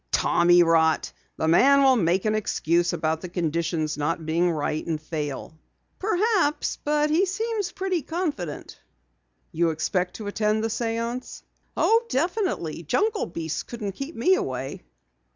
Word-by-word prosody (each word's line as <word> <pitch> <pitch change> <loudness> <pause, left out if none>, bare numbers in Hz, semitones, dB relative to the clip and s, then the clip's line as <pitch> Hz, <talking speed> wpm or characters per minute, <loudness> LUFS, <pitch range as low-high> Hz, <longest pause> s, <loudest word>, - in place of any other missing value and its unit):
"Tommyrot! 165 -2 +4 0.3
The 160 - -1
man 275 +12 +5
will 265 -1 +6
make 185 -2 +1
an 215 - +2
excuse 175 -5 +1
about 160 -2 -1
the 180 - -6
conditions 165 -2 -1
not 165 +2 -1
being 170 +3 +2
right, 155 -1 -2
and 160 -2 -1
fail." 155 0 -5 0.4
"Perhaps, 395 -5 +1
but 300 0 +1
he 360 +5 +3
seems 425 0 -2
pretty 375 -3 -2
confident." 290 - -4 0.7
"You 170 +1 +1
expect 180 +3 -1
to 215 - -7
attend 215 +1 0
the 225 - 0
séance?" 230 +2 -3 0.3
"Oh, 455 +1 +4
definitely. 335 - -1
Jungle 410 - 0
beasts 165 -2 -4
couldn't 220 -4 -5
keep 275 - -7
me 360 +12 +3
away." 130 - -3
190 Hz, 135 wpm, -25 LUFS, -, 0.7 s, will